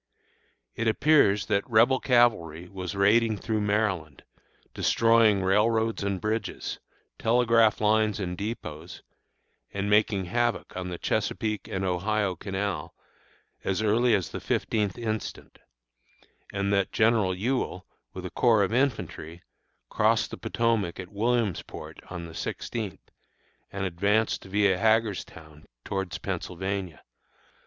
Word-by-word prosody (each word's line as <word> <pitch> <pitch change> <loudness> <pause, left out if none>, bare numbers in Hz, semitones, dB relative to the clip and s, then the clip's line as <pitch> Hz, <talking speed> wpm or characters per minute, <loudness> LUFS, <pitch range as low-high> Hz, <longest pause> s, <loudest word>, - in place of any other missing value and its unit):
It 115 - -2
appears 110 -5 +4
that 100 +1 0
Rebel 120 +4 +4
cavalry 100 - +2
was 95 +1 -6
raiding 110 +3 +3
through 110 0 -2
Maryland, 100 -8 -1 0.5
destroying 115 -4 +3
railroads 110 +4 +2
and 100 -2 -1
bridges, 110 +2 -3 0.4
telegraph 115 -2 +3
lines 110 0 +2
and 90 -2 -3
dépôts, 90 -6 -6 0.7
and 100 +1 -2
making 105 -2 +3
havoc 120 +4 -1
on 90 0 -4
the 90 - -5
Chesapeake 105 +3 -2
and 95 0 -3
Ohio 95 +2 0
Canal 95 -3 -4 0.7
as 95 +3 -1
early 115 +3 +3
as 95 - -2
the - - -5
fifteenth 105 -4 -1
instant; 110 -2 -5 0.9
and 100 0 -1
that 100 -1 +1
General 110 -4 +2
Ewell, 105 -3 -2 0.3
with 95 -1 -8
a 90 - -5
corps 115 -4 +3
of 100 - -1
infantry, 110 - -2 0.5
crossed - - +2
the - - -6
Potomac 115 -7 0
at 90 -1 -7
Williamsport 110 -2 -2
on 85 -2 -6
the 80 - -10
sixteenth, 100 +4 -5 0.6
and 95 0 -3
advanced 100 +6 0
via 95 -1 +2
Hagerstown 100 -9 -1 0.2
towards 95 -2 -3
Pennsylvania. 95 -1 -4
105 Hz, 120 wpm, -27 LUFS, 95-115 Hz, 0.9 s, appears